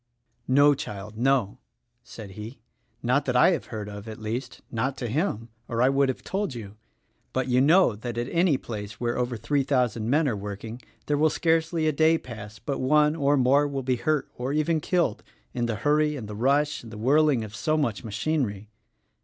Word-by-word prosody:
"No, 145 +3 +5
child, 105 -5 -7
no!" 125 -3 +1 0.4
said 105 -4 -10
he, 105 +5 -8 0.5
"not 125 +4 +2
that 125 - -1
I 125 - +6
have 170 - -2
heard 105 -2 -6
of; 105 +1 -8
at 110 - -7
least, 120 +4 -5
not 130 +3 -1
to 120 - -3
him, 115 - -1 0.2
or 115 - -3
I 130 - +5
would 135 0 +2
have 130 - -4
told 195 -8 -2
you; 105 -3 -8 0.6
but 130 0 0
you 125 0 +3
know 155 - +5
that 115 +2 -6
at 120 +1 -1
any 170 -4 +3
place 105 -3 -7
where 120 -1 -1
over 125 -1 -1
three 145 +5 0
thousand 125 -5 0
men 150 +3 +3
are 120 - 0
work 100 0 -6
ing 115 +2 -7 0.2
there 145 -1 0
will 155 +1 +4
scarcely 165 0 +1
a - - +4
day 160 +2 +3
pass 110 -6 -9
but 135 +5 -4
one 150 +3 +3
or 145 -2 +2
more 140 +3 +4
will 140 -2 -3
be 125 0 0
hurt 155 +1 0
or 125 +2 -2
even 155 +2 +1
killed, 170 - 0 0.3
in 120 -1 -1
the 115 - -1
hurry 150 +6 +2
and 120 -7 -6
the 105 - -7
rush, 140 +6 +1
and 115 - -12
the 110 - -8
whirling 140 +2 +3
of 110 0 -8
so 155 +5 0
much 130 -7 -1
machinery." 110 -2 -2
130 Hz, 205 wpm, -26 LUFS, 110-150 Hz, 0.6 s, I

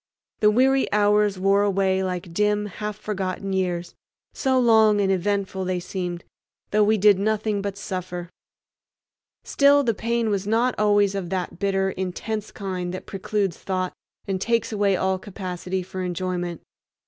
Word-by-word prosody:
The 210 - +5
weary 265 +4 +3
hours 210 -1 +3
wore 195 +2 +3
away 195 -1 +1
like 180 -2 -4
dim 210 +2 +1
half 210 +1 -5
forgotten 195 -2 -3
years, 180 -2 -1 0.4
so 260 -2 +1
long 220 -3 +5
and 195 -1 +2
eventful 190 0 -1
they 185 -1 -1
seemed, 175 -1 -4 0.5
though 210 +1 +4
we 215 +1 +3
did 205 -1 +5
nothing 215 0 0
but 200 0 -4
suffer. 180 -3 -5 1.1
Still 285 0 +4
the 235 -3 +1
pain 230 +1 -1
was 200 -1 -1
not 235 +4 +2
always 205 -1 +3
of 190 -3 -4
that 180 -2 -3
bitter, 195 -1 +1
intense 200 +4 -4
kind 185 -3 -4
that - - -8
precludes 195 -2 -2
thought 185 -1 -2 0.3
and 190 -1 -2
takes 230 +2 0
away 200 -2 +2
all 190 0 0
capacity 185 -1 -4
for 185 +1 -6
enjoyment. 175 -1 -3
195 Hz, 150 wpm, -24 LUFS, 185-210 Hz, 1.1 s, The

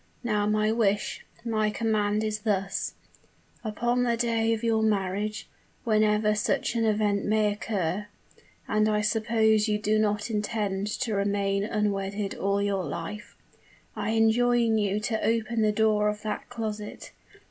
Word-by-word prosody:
Now 210 -3 +1
my 215 0 +2
wish 210 -3 0 0.2
my 215 -2 +1
command 210 -1 0
is 215 0 -2
this: 195 -2 -1 0.7
Upon 240 +3 0
the 235 -1 +1
day 230 -1 +1
of 225 0 -1
your 225 -1 +2
marriage, 210 0 -1 0.4
whenever 215 -1 +3
such 210 - 0
an 230 -1 +1
event 210 -2 +1
may 210 0 +2
occur 205 -2 -2 0.6
and 215 0 +2
I 210 0 +1
suppose 220 0 +2
you 210 -1 +1
do 215 +1 +1
not 210 +1 0
intend 210 -2 -1
to 235 -4 -1
remain 200 0 0
unwedded 205 -1 -1
all 200 +1 0
your 200 -2 0
life 170 +7 -6 0.6
I 215 0 -2
enjoin 225 0 +3
you 205 0 0
to 220 0 -2
open 230 0 0
the 215 -1 +3
door 210 0 +2
of 210 +1 -5
that 215 -1 -4
closet. 215 -3 -5
215 Hz, 145 wpm, -27 LUFS, 205-220 Hz, 0.7 s, whenever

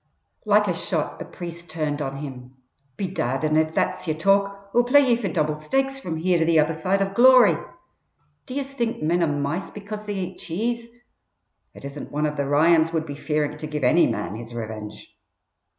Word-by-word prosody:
Like 210 0 +4
a 180 - +1
shot 165 -2 -2
the - - -6
priest 170 -1 -9
turned 155 -2 -2
on 135 -1 -3
him. 130 -3 -8 0.4
"Bedad, 155 -8 -2
an' 155 0 +1
if 155 0 +1
that's 185 0 0
yer 155 - 0
talk, 200 +3 +1
Oi'll 240 - +5
play 270 +4 +6
ye 240 - +5
fer 230 -4 -3
double 155 -3 -1
stakes 270 - -1
from 170 -10 -4
here 175 +1 +2
to 160 - +2
the 165 0 +3
other 155 +2 +2
side 190 +5 0
of 195 0 -4
glory. 250 0 +7 0.9
Do 255 - -6
yez 275 -1 -3
think 235 - -2
men 170 +3 +2
are 170 - +3
mice 145 +5 -2
because 210 +1 -8
they 205 - -2
eat 185 -1 -5
cheese? 230 +7 -3 0.9
It - - -11
isn't 140 +1 -7
one 150 +1 0
of 150 0 -2
the 140 -1 -1
Ryans 160 +3 +4
would 160 -1 -1
be 145 - -6
fearing 150 0 -2
to 155 - -5
give 150 -2 -4
any 155 +8 +5
man 105 -5 -3
his 115 +2 -8
revinge!" 110 -2 -7
165 Hz, 200 wpm, -24 LUFS, 150-200 Hz, 0.9 s, glory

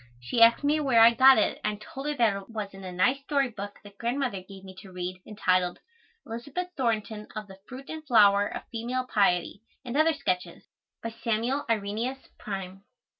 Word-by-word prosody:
She 120 - -2
asked 230 +4 +6
me 295 +2 +2
where 265 -6 +3
I 230 +1 +8
got 260 +2 +7
it 215 - +1
and 210 0 0
I - - -16
told 270 +6 -8
her 295 - -1
that 230 -6 +3
it 195 +1 -8
was 215 -3 -5
in 195 0 -11
a 185 - -6
nice 250 +10 +1
story 275 -2 0
book 205 -3 -8
that 200 -1 -15
Grandmother 240 -4 -1
gave 190 +1 -13
me 190 -1 -11
to 190 0 -13
read 180 0 -5
entitled 185 -4 +1 0.5
"Elizabeth 280 +9 -5
Thornton 220 -4 -2
or 215 - -4
the 190 -1 -14 0.5
Flower 205 -3 +5
and - - -8
Fruit - - -3
of - - -37
Female 245 +2 -2
Piety, 195 -4 +1 0.2
and 245 +1 -5
other 315 +2 +4
sketches," 180 -10 -3 0.4
by 230 - -3
Samuel 230 +5 -1
Irenaeus 225 +5 -2
Prime. 195 -1 -6
220 Hz, 195 wpm, -27 LUFS, 195-250 Hz, 0.5 s, I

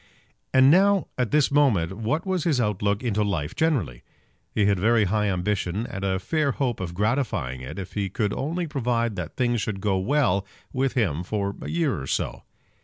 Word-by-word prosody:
And 130 +1 +6
now, 195 +2 +4
at 125 -3 0
this 150 -2 +3
moment, 110 - +3
what 115 - -2
was 185 -4 0
his 150 -7 +1
outlook 105 -1 0
into 105 -3 +1
life 85 -8 -2
generally? 120 - 0 0.5
He 105 - +1
had 100 -2 +2
very 110 +3 +4
high 105 +2 +1
ambition, 100 +2 -1
and 100 -4 -6
a 95 -1 +1
fair 145 - 0
hope 125 -5 -1
of 85 -2 -5
gratifying 105 - -1
it 65 +7 -7
if 95 -2 -6
he 100 -2 -1
could 105 +2 -1
only 170 +5 -2
provide 120 -7 -1
that - - -5
things 120 -3 +1
should 100 -2 -3
go 95 -1 +1
well 100 -3 +2 0.3
with 135 0 0
him 90 - 0
for 100 +1 -2
a - - -5
year 160 - 0
or 65 - -6
so. - - -2
110 Hz, 190 wpm, -25 LUFS, 95-135 Hz, 0.5 s, And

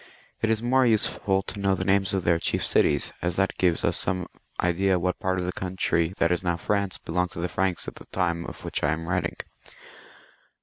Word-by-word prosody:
It 110 - +1
is 110 0 +1
more 130 +2 +4
useful 105 -4 +2
to 105 - -6
know 100 -1 +2
the 95 - -3
names 95 0 +2
of 95 -2 -1
their 85 -1 +3
chief - - 0
cities, - - +2
as 90 0 -1
that 95 0 +1
gives 90 -3 +2
us - - +1
some 90 0 -1 0.3
idea 95 +2 +2
as - - +4
to - - +1
what 90 0 -1
part 95 0 0
of 90 - -1
the 90 - -2
coimtry 90 -2 0
that 85 -2 +2
is 90 +1 0
now 85 -1 0
France 100 +2 -1
belonged 90 +2 -1
to - - -7
the 85 - -1
Franks 95 -1 -1
at - - -7
the - - -13
time 85 -2 -1
of - - -9
which - - -2
I 75 +1 +3
am 80 +1 -5
writing. 90 - -1
90 Hz, 230 wpm, -26 LUFS, 85-95 Hz, 0.3 s, more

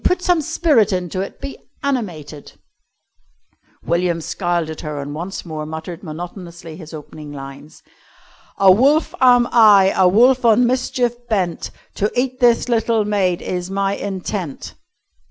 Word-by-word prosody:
Put 360 0 +1
some 355 -3 +2
spirit 295 - +2
into 180 0 -2
it. 195 - -7
Be 275 - -7 0.2
animated." 175 - -4 1.3
William 170 0 0
scowled 170 0 -2
at 155 - -8
her 150 -1 -5
and 140 +1 -6
once 175 +6 -6
more 155 -2 -5
muttered 160 +3 -7
monotonously 170 0 -8
his 160 -2 -11
opening 150 -1 -10
lines: 140 +1 -11 0.7
"A 195 -1 +6
wolf 275 - +3
am 245 -1 +5
I 205 -4 +6
a 185 - +4
wolf 245 +7 +4
on 235 +1 +5
mischief 250 -1 0 0.2
bent, 185 -6 -1 0.3
To 205 +2 0
eat 255 0 -2
this 240 -1 +3
little 230 -2 +1
maid 195 -4 0
is 180 0 -4
my 195 0 -1
intent." 190 -5 -5
190 Hz, 140 wpm, -19 LUFS, 165-235 Hz, 1.3 s, A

